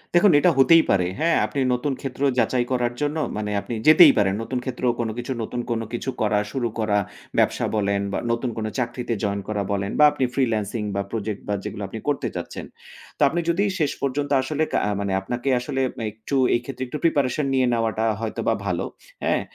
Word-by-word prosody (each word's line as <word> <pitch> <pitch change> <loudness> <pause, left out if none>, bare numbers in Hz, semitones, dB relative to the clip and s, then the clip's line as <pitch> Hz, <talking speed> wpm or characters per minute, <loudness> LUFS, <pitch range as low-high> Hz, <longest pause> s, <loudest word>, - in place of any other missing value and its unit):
দেখুন 175 +3 +6
এটা 175 +4 +4
হতেই 165 +5 +7
পারে 90 -2 +3
হ্যাঁ? 165 +1 +3
আপনি 140 - -4
নতুন 130 +3 -1
ক্ষেত্র 135 -1 -6 0.2
যাচাই 120 0 +2
করার 120 -2 0
জন্য 145 +2 0 0.2
মানে 105 -1 -3
আপনি - - -6
যেতেই 155 -1 +9
পারেন। 95 -2 +3
নতুন 125 +2 -3
ক্ষেত্র 130 - -5 0.2
কোন 115 -1 -1
কিছু 120 +2 -4
নতুন 120 +2 -3
কোন 115 -1 0
কিছু 120 +2 -3
করা, 105 -1 +2
শুরু 125 -1 -1
করা 105 -2 +1 0.4
ব্যবসা - - +2
বলেন, 100 -1 +1
বা - - -1
নতুন 120 +2 -1
কোন 110 - -2
চাকরিতে 120 0 -2
জয়েন 100 -1 0
করা 105 -1 -1
বলেন 100 0 -1
বা 150 - +8
আপনি 135 -3 0
ফ্রিল্যান্সিং 110 -4 0
বা 100 - 0
প্রজেক্ট, 110 -2 -3
বা 105 - 0
যেগুলো 100 - -5
আপনি 110 +3 -7
করতে 145 -1 0
চাচ্ছেন। - - -6 0.5
তো - - -10
আপনি 175 - -1
যদি 170 +4 +2 0.2
শেষ 150 -3 +1
পর্যন্ত 140 +1 -1
আসলে 150 +3 -1
কা - - +1
আ - - 0
মানে 100 -1 -2
আপনাকে 120 +7 -3
আসলে 130 +2 -2 0.3
একটু 110 +6 -5 0.2
এই - - +2
ক্ষেত্রে 130 0 -5
একটু 135 - -4
প্রিপারেশন 145 -3 +1
নিয়ে 130 -1 +3
নেওয়াটা 115 -1 0 0.2
হয়তোবা 115 0 -1
ভালো। 90 -3 -1 0.4
হ্যাঁ? - - +1
120 Hz, 200 wpm, -23 LUFS, 110-140 Hz, 0.5 s, যেতেই